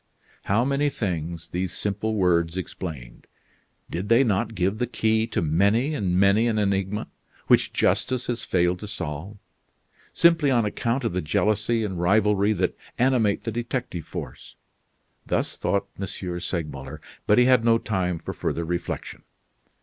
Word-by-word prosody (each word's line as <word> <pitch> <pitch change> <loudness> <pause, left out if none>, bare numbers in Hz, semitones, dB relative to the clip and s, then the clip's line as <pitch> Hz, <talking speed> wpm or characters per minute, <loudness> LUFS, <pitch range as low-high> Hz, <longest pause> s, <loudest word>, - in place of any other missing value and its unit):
How 110 +5 +2
many 140 +2 +1
things 85 - -4
these 90 +1 -2
simple 105 +2 -2
words 85 -3 +2
explained. 80 -9 -7 0.6
Did 90 +4 -4
they 115 +3 +6
not 110 0 0
give 95 +3 0
the 125 - 0
key 110 -1 +1
to - - -1
many 100 - +2
and 95 -10 0
many 100 +4 +4
an 110 -2 0
enigma 100 +1 0 0.4
which - - +4
justice 130 -1 +1
has 120 -1 -3
failed 90 0 +1
to 105 - -7
solve, 90 0 -5 0.7
simply 165 -4 +4
on 120 -4 +3
account 115 +5 -1
of 115 - -1
the 90 - 0
jealousy 105 +8 +1
and 95 -4 -3
rivalry 105 +2 +3
that 90 -2 -1 0.2
animate 120 -5 +2
the 115 - -3
detective 120 - -4
force? - - -8 0.7
Thus - - 0
thought 100 0 0
M. 100 - -3 0.3
Segmuller, 75 -7 -5 0.3
but 105 - +5
he 125 - +6
had 125 -2 +5
no 115 0 +5
time 95 -6 -1
for 80 - -6
further 85 - -2
reflection. 85 +1 -4
100 Hz, 150 wpm, -25 LUFS, 90-115 Hz, 0.7 s, they